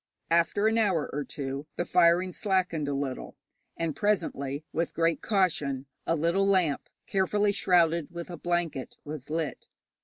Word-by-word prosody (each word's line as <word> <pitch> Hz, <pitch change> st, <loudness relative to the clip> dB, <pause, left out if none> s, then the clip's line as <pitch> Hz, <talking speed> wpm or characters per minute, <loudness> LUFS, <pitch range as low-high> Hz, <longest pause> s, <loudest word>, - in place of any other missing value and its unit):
After 170 Hz, +5 st, +3 dB
an 225 Hz, +1 st, +3 dB
hour 190 Hz, -8 st, +2 dB
or 145 Hz, +1 st, -1 dB
two 140 Hz, +1 st, -5 dB
the 175 Hz, -, -1 dB
firing 180 Hz, +1 st, +4 dB
slackened 180 Hz, -6 st, 0 dB
a 140 Hz, -, -1 dB
little, 135 Hz, -2 st, -4 dB, 0.4 s
and 165 Hz, -3 st, -1 dB
presently, 155 Hz, -8 st, -1 dB
with 170 Hz, +1 st, -1 dB
great 165 Hz, 0 st, +1 dB
caution, 150 Hz, -10 st, +1 dB, 0.2 s
a 165 Hz, -, +3 dB
little 170 Hz, +5 st, +2 dB
lamp, 180 Hz, -8 st, +2 dB, 0.2 s
carefully 200 Hz, +2 st, +2 dB
shrouded 170 Hz, -5 st, +3 dB
with 170 Hz, 0 st, -7 dB
a 175 Hz, -, -6 dB
blanket, 175 Hz, -5 st, -2 dB
was 150 Hz, -2 st, -7 dB
lit. 155 Hz, -3 st, -3 dB
170 Hz, 150 wpm, -28 LUFS, 150-185 Hz, 0.4 s, firing